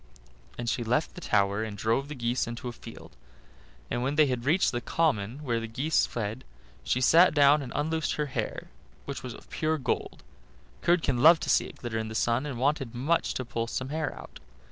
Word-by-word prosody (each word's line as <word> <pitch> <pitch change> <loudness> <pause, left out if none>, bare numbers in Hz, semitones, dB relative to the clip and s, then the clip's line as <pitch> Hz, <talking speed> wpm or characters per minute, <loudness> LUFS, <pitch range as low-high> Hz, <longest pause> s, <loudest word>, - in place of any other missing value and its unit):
Then 120 - -4
she 120 +1 -1
left 125 +7 0
the 180 - -10
tower 100 - +1
and 105 -2 -6
drove 115 +7 0
the 150 - -7
geese 120 0 -1
into 120 +1 -6
a - - -3
field. 115 - -12 0.8
And 120 - -1
when 135 +3 -1
they 155 0 +6
had 125 -3 -2
reached 165 +7 +3
the 120 - -3
common 135 -4 0
where 120 -4 0
the 115 - -5
geese 140 +8 +1
fed 115 +2 -4 0.4
she 125 - 0
sat 165 +6 +6
down 145 +1 +6
and 130 - -7
unloosed 160 +1 0
her 150 - -1
hair, 135 - -4 0.3
which - - -5
was - - -7
of - - -15
pure 155 0 0
gold. 130 - -3 0.6
Curdken 165 -8 +2
loved 165 +3 +7
to - - +1
see - - +3
it - - -11
glitter 115 -2 -4
in 110 - -3
the 110 - -7
sun, 120 +5 +1
and 135 -4 -5
wanted 135 -2 0
much 150 +7 0
to 130 - -3
pull 115 -1 -3
some 130 +2 -4
hair 155 +1 -2
out. - - -11
130 Hz, 210 wpm, -28 LUFS, 115-150 Hz, 0.8 s, loved